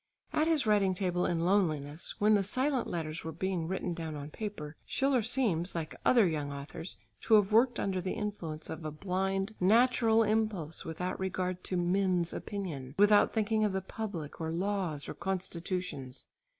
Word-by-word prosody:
At 310 +1 +2
his 315 -5 +2
writing 200 -3 +3
table 180 -1 0
in 170 -1 0
loneliness, 155 -6 0
when 210 +1 +4
the 205 - +4
silent 255 +6 0
letters 160 -2 -4
were 160 - -4
being 175 0 -2
written 185 -1 -2
down 165 -2 -5
on 145 +1 -7
paper, 160 -8 -6
Schiller 270 -2 +1
seems 210 -8 +1
like 160 -2 -3
other 235 -4 +5
young 150 -3 -2
authors 145 +5 -7 0.2
to 225 - +5
have 205 -1 +4
worked 240 +3 +4
under 190 -2 -1
the 185 - -2
influence 180 -8 -4
of 160 - -6
a 155 - -2
blind 195 +5 -1
natural 225 +2 +4
impulse 210 -7 -1
without 180 +3 -4
regard 185 -1 -2
to 185 - -1
mens' 180 -1 +1
opinion, 155 -10 -5
without 205 +1 +6
thinking 220 0 +1
of 210 -2 +1
the 190 - +1
public, 190 -7 -6
or 160 - -2
laws, 180 -4 -2
or - - -4
constitutions. 180 -7 -4
185 Hz, 170 wpm, -31 LUFS, 165-210 Hz, 0.2 s, without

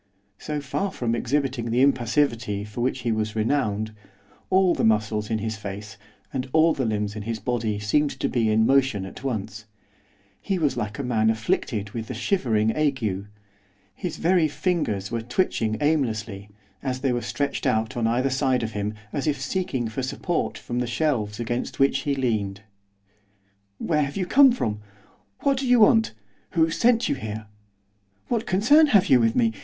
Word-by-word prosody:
So 150 -1 -3
far 185 +9 -2
from 120 -8 -2
exhibiting 125 -1 -1
the 120 +3 +3
impassivity 120 -5 +1
for 105 +3 -6
which 130 +1 -1
he 120 - -1
was 110 0 -2
renowned, 110 -2 0 0.6
all 185 -1 +4
the - - -1
muscles 110 -1 +1
in 110 - 0
his 110 +1 -3
face 100 0 -7 0.4
and 130 0 -3
all 160 +1 +5
the 130 - -2
limbs 105 -1 -1
in 105 - -5
his 115 +2 -3
body 110 -1 -2
seemed 125 +9 +1
to - - 0
be 115 -3 +1
in 110 +1 +3
motion 130 -7 +2
at 95 - -10
once; 110 -4 -4 0.8
he 195 -2 -1
was 150 -5 +1
like 105 -4 -4
a 140 - -3
man 110 -3 +2
afflicted 110 -2 -1
with 110 +1 -5
the - - -5
shivering 110 - +1
ague, 115 -10 -1 0.7
his 175 - -5
very 170 -1 +3
fingers 150 - -1
were 115 -1 -1
twitching 115 -3 0
aimlessly, 110 -9 -1 0.3
as 130 -1 -3
they 135 -2 +1
were 120 - -1
stretched 140 +5 -2
out 110 0 0
on 115 -2 0
either 125 +4 +1
side 130 -2 +1
of 110 - -3
him, 105 0 -3 0.2
as 140 +1 -2
if 145 -3 0
seeking 135 -4 -2
for 110 +4 -4
support 150 +6 -2
from 120 0 -4
the 125 - -1
shelves 120 -5 -1
against 120 +1 -3
which 135 0 +3
he 140 0 -1
leaned. 105 -7 -1 1.2
'Where 155 -3 0
have 140 +2 -2
you 185 - 0
come 270 +7 +6
from? 110 - -2 0.6
what 275 -2 +2
do 265 - -2
you 245 -2 +5
want? 220 - +4 0.4
who 165 -1 +3
sent 235 +5 +3
you - - +1
here? 110 -4 -6 0.8
what 230 -2 -1
concern 270 +12 +5
have 200 -8 +4
you 130 -5 +6
with 115 -1 +2
me? 115 -2 +2
120 Hz, 180 wpm, -24 LUFS, 110-150 Hz, 1.2 s, come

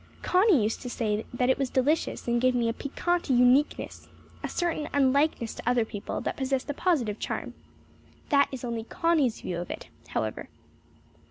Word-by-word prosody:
Connie 365 - +4
used 215 +2 -1
to 250 - -5
say 215 -3 -2
that 250 +1 +2
it 260 - 0
was 270 -2 0
delicious 280 +4 0
and 235 0 +1
gave 255 0 +3
me 235 -1 +1
a 230 - 0
piquant 345 +6 -2
uniqueness 255 +3 +2 0.4
a - - -2
certain 335 -4 -1
unlikeness 280 -3 +2
to - - -3
other 245 -2 +2
people 205 -2 -5
that - - -3
possessed 265 +1 -1
a - - -4
positive 275 - 0
charm. - - -4 0.8
That 280 -2 +4
is 265 -2 -6
only 235 -2 -3
Connie's 305 -5 +1
view 175 -1 -3
of 175 - -6
it, - - -7 0.2
however. - - -3
255 Hz, 175 wpm, -27 LUFS, 235-295 Hz, 0.8 s, Connie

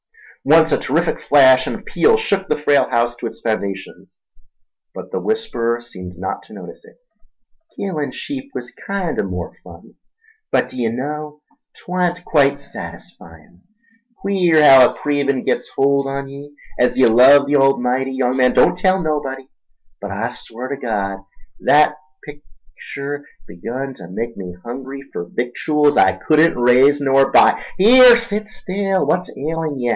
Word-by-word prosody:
Once 160 +2 +4
a - - +3
terrific 165 +6 -1
flash 130 -2 +4
and - - -6
peal 450 +1 +2
shook 200 - -2
the 150 - -1
frail 145 -1 +2
house 120 -1 0
to 120 - -6
its - - -10
foundations, 100 -3 -5 0.8
but - - -9
the - - -2
whisperer 165 - -2
seemed 90 -7 -11
not 95 +2 -5
to - - -21
notice - - -11
it. - - -19 0.8
"Killin' 160 -7 -4
sheep 275 -1 -7
was 125 0 -7
kinder 195 -4 -4
more 90 -4 -6
fun—but 445 -1 -7
d'ye 120 -3 -3
know, 150 +5 -6 0.4
'twan't 180 -1 -3
quite 140 -3 +2
satisfyin'. 85 - -12 0.6
Queer 190 -4 0
haow 135 -3 +8
a - - -8
cravin' 140 -3 -1
gits - - -2
a - - -23
holt 140 0 +2
on 140 0 -4
ye— 140 +1 -11 0.3
As 125 - +1
ye 130 - +5
love 130 +5 +6
the 145 +1 0
Almighty, 135 -1 +1
young 130 0 -1
man, 125 -1 +3
don't - - +4
tell 190 0 +1
nobody, 140 -5 -4 0.5
but - - -6
I - - -4
swar 125 +3 -9
ter 140 - -3
Gawd 100 -6 -3 0.4
thet 150 +1 +4 0.3
picter 145 +1 -10 0.2
begun 125 +10 -6
ta 95 -8 -12
make 115 +5 -5
me 90 -2 -8
hungry 135 +3 -8
fer - - -4
victuals 145 - -1
I 95 0 +4
couldn't 155 - +2
raise 125 +4 +4
nor 135 -1 +2
buy—here, 240 +4 +5
set 215 -2 -4
still, 195 -1 -2
what's 180 0 -1
ailin' 155 0 -4
ye? 120 -1 -2
140 Hz, 150 wpm, -18 LUFS, 120-165 Hz, 0.8 s, haow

